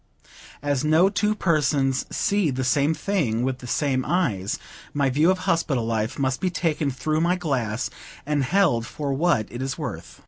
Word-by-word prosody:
As 145 -2 0
no 160 +5 +4
two 210 +1 +1
persons 145 -7 +1
see 200 -5 +1
the 130 -1 -2
same 140 +4 +2
thing 140 - 0
with 130 0 -1
the 125 - -9
same 130 0 0
eyes, 105 - 0 0.4
my 140 -2 +2
view 150 +6 +3
of 190 - +3
hospital 160 -9 0
life 110 -1 -1
must 130 -2 -1
be 185 - +1
taken 160 -4 0
through 155 +4 -1
my 175 +2 +2
glass, 130 -10 -2 0.3
and 145 -1 +1
held 145 -7 +2
for 145 -2 -3
what 150 -6 +2
it 120 - -6
is 130 0 -3
worth. 110 - -6
145 Hz, 175 wpm, -24 LUFS, 125-170 Hz, 0.4 s, no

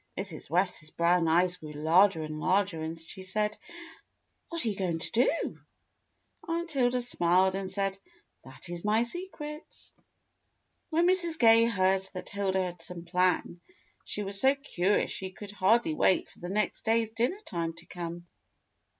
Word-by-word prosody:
Mrs. 190 -5 -6
West's 175 -2 0
brown 170 +1 +2
eyes 175 +2 +3
grew 155 -1 -9
larger 160 +4 +4
and 155 0 -5
larger, 185 -1 +1
and 160 +1 -4
she 165 +3 -6
said, 210 +3 -1 1.0
"WTiat 335 -6 0
are - - 0
you 205 - -3
going 180 -4 -1
to 165 - -3
do.^" 250 +8 +1 0.9
Aunt 335 0 -2
Hilda 250 -3 +2
smiled 185 -4 +3
and 195 0 -3
said, 195 0 -1 0.4
"That 130 +4 -10
is 175 -1 -6
my 215 +2 +3
secret." 300 +2 -7 1.0
When 335 +1 +2
Mrs. 350 -3 +2
Gay 230 -2 +6
heard 190 -4 +2
that 185 - -6
Hilda 190 -2 0
had 175 -2 -6
some 170 0 -7
plan, 180 0 0 0.4
she 210 - -4
was 195 0 0
so 270 +1 +5
curious 205 -8 0
she 190 - -5
could 200 +2 -10
hardly 205 -1 +2
wait 185 +4 +2
for - - -21
the 175 - -6
next 210 +2 -1
day's 225 -1 +1
dinner 240 - 0
time 165 -2 -3
to 170 +1 -15
come. 170 -1 -7
190 Hz, 160 wpm, -29 LUFS, 175-230 Hz, 1.0 s, Gay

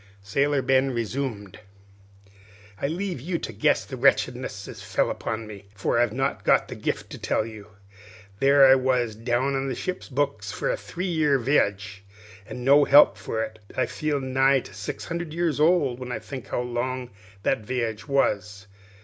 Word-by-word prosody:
Sailor 140 +7 +1
Ben 135 +1 +3
resumed: 115 -4 -4 1.2
"I - - +1
leave 175 -1 -3
you 170 +5 -2
to 115 - -6
guess 100 - +2
the - - -7
wretchedness - - +1
as - - -9
fell - - 0
upon 110 0 -4
me, 105 -2 -10
for 105 +3 0
I've 120 -2 +2
not 135 +4 -2
got - - +3
the - - -6
gift - - -3
to - - -8
tell 110 - 0
you. 110 -2 -10 0.7
There 140 0 +6
I 130 - +8
was 130 -3 +1
down 120 +5 0
on 135 0 -1
the 130 - -2
ship's 185 +7 -5
books 140 +1 -1
for - - -1
a - - 0
three 185 - -6
years' 150 -8 +1
viage, 100 -7 +1 0.5
an' 125 +2 -7
no 140 +3 +6
help 145 +1 +7
for 110 +2 -3
it. 110 0 -8 0.2
I - - +2
feel 150 -2 -2
nigh 135 0 +2
to 100 - -13
six 105 +2 -6
hundred 170 -2 -5
years 170 -3 0
old 150 -6 +3
when 125 -1 -6
I 120 - -2
think 120 +3 -8
how - - -2
long 125 0 -3 0.3
that - - +1
viage 115 -1 -3
was. 105 -8 0
130 Hz, 180 wpm, -25 LUFS, 110-140 Hz, 1.2 s, I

